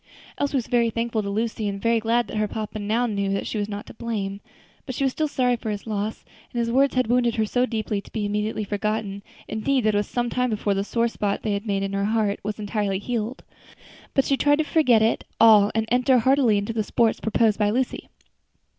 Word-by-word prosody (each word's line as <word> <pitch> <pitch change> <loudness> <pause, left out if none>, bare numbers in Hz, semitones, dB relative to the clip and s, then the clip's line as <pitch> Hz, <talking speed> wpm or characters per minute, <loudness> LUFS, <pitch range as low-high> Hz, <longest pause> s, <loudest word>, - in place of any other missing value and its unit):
Elsie 285 -1 0
was 245 - -1
very 235 -1 +2
thankful 230 0 -1
to 200 - -4
Lucy, 220 +1 -2
and 200 -1 -3
very 230 +2 +2
glad 230 +2 +1
that - - -5
her 215 0 +1
papa 215 0 -5
now 220 +4 0
knew 200 -4 -1
that 195 0 -1
she 215 - -3
was 205 0 -2
not 205 0 -5
to - - -11
blame; 205 -4 -4 0.5
but 260 - -4
she 275 - -1
was 265 - +2
still 310 +3 -1
sorry 250 -4 +1
for 225 -1 -5
his 205 -1 -4
loss, 215 0 -3 0.3
and - - -7
his 235 -1 0
words 270 +3 +3
had 255 - +3
wounded 240 0 +2
her 220 -2 +1
too 245 +4 +1
deeply 215 -3 -2
to - - -17
be 215 -2 -2
immediately 210 +1 -1
forgotten; 205 0 -2 0.3
indeed 235 +3 0
it 215 - +3
was 205 0 0
some 240 -1 -1
time 250 0 0
before 210 -2 0
the 195 0 -1
sore 230 +3 0
spot 205 -3 -2
they 215 - 0
had 200 +2 -3
made 195 -1 0
in 195 0 -3
her 200 0 0
heart 215 -1 0
was 210 0 -4
entirely 205 -2 -1
healed. 230 +4 -3 0.7
But 270 - +3
she 275 - +1
tried 290 +1 +3
to 315 - +2
forget 255 -8 +3
it 225 - +1 0.2
all 215 -2 +7
and 220 0 +1
enter 250 +1 +4
heartily 250 -2 +3
into 205 +3 -2
the 220 - 0
sports 230 +1 +1
proposed 220 -1 +1
by 205 -1 +3
Lucy. 250 +4 -2
220 Hz, 235 wpm, -24 LUFS, 205-240 Hz, 0.7 s, all